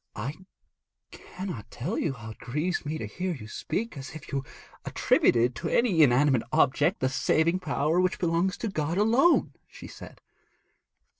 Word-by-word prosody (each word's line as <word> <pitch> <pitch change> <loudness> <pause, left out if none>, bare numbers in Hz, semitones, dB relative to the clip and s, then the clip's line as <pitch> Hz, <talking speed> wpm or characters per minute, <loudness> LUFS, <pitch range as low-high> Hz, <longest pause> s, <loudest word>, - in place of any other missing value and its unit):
'I 120 +7 -4 0.8
cannot 180 - -8
tell 120 - -4
you 150 - -1
how 115 -3 -9
it - - -14
grieves 150 +8 -2
me 155 +2 -2
to - - -5
hear 185 -1 -3
you 110 -6 -10
speak 225 - -4
as 140 +2 -8
if 155 - -10
you 135 -1 -1 0.4
attributed 120 +1 +2
to - - -3
any 215 -9 +3
inanimate 135 -2 +4
object 130 - +2
the 130 - +2
saving 160 +6 +1
power 155 +1 +1
which 185 0 0
belongs 175 +2 0
to 230 - -3
God 165 -3 -2
alone,' 235 - +3
she - - -12
said. - - -11
155 Hz, 160 wpm, -27 LUFS, 130-185 Hz, 0.8 s, inanimate